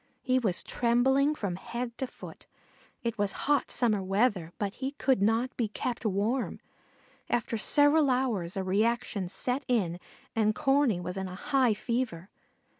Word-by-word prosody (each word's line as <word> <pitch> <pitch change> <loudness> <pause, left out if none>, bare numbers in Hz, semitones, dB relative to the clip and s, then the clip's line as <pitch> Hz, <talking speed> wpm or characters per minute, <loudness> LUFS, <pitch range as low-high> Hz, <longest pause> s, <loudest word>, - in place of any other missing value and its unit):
He 255 0 +2
was 200 -8 0
trembling 265 +5 +2
from 195 -9 -3
head 235 +4 -5
to 265 - -1
foot. - - -12 0.6
It 230 -2 -2
was 205 0 0
hot 290 0 +2
summer 220 -6 +2
weather, 195 -3 +1
but 200 -1 -2
he 265 +1 -4
could 265 -5 +1
not 225 +5 +1
be 235 - 0
kept 235 +3 -4
warm. 215 +6 -1 0.7
After 235 -1 0
several 290 +5 +4
hours 230 -9 0
a 190 - -1
reaction 205 0 0
set 250 +8 -1
in 185 -9 0 0.4
and 215 -1 +2
Corney 270 -8 +2
was 180 +2 -5
in 190 0 -3
a 185 - -7
high 255 +1 +2
fever. 220 -7 -3
235 Hz, 155 wpm, -29 LUFS, 195-255 Hz, 0.7 s, several